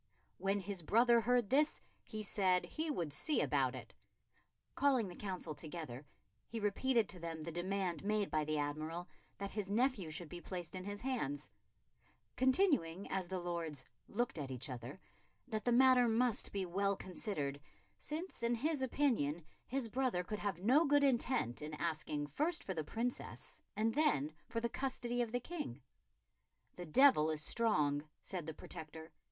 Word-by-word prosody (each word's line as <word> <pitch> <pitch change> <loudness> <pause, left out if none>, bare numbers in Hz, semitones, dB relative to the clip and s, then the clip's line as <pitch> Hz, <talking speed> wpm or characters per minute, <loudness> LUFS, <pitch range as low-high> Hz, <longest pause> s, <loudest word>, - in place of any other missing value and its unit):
"When 195 +1 +1
his 190 -1 -4
brother 235 +7 +5
heard 240 -2 +2
this, 300 +3 +3 0.2
he 215 -3 -5
said 185 -3 +3
he 315 0 -3
would 170 - -2
see 300 - +2
about - - +2
it." - - -9 0.8
Calling 265 -6 +3
the 175 - -8
Council 185 -6 -4
together, 150 -4 -7 0.4
he 230 - -4
repeated 225 +2 +2
to 180 - -7
them 165 -2 -5
the 165 - -4
demand 185 +1 -1
made 210 0 0
by 155 -1 +2
the 155 0 -1
Admiral 155 +4 -3 0.3
that 200 0 -4
his 210 -3 -3
nephew 225 -5 +1
should 160 +2 -4
be 175 +3 -8
placed 175 -2 -5
in 185 0 -5
his 205 0 -5
hands; 150 - -2 0.8
continuing, 260 - +3
as 190 -2 -1
the 190 +1 -3
Lords 170 -6 -3 0.2
"looked 235 -6 -1
at 140 -2 -4
each 130 +2 -5
other," 125 +7 -7 0.5
that 215 -4 -3
the 245 - +3
matter 255 0 +6
must 230 0 +2
be 195 -2 -1
well 195 +3 +1
considered, 155 -8 -2 0.4
since 325 +1 -4
in 235 +1 +2
his 295 +4 0
opinion 235 - +1 0.2
his 265 -2 -1
brother 245 -6 0
could 210 +3 -4
have 190 -3 -3
no 265 +9 +6
good 290 -1 +4
intent 240 - +2
in 150 +1 -5
asking 155 -2 -2
first 305 - 0
for 190 - -3
the 160 -3 -2
Princess, 235 +10 -4
and 220 +1 +1
then 155 - +2
for 230 - -2
the 235 - 0
custody 245 -1 -2
of 235 -2 -1
the 245 - 0
King. 245 - -5 1.0
"The 175 -1 -7
devil 205 - +6
is 155 -1 -1
strong," 150 -9 +2
said 175 -5 -5
the 160 - -5
Protector. 160 -1 -8
195 Hz, 170 wpm, -37 LUFS, 160-245 Hz, 1.0 s, matter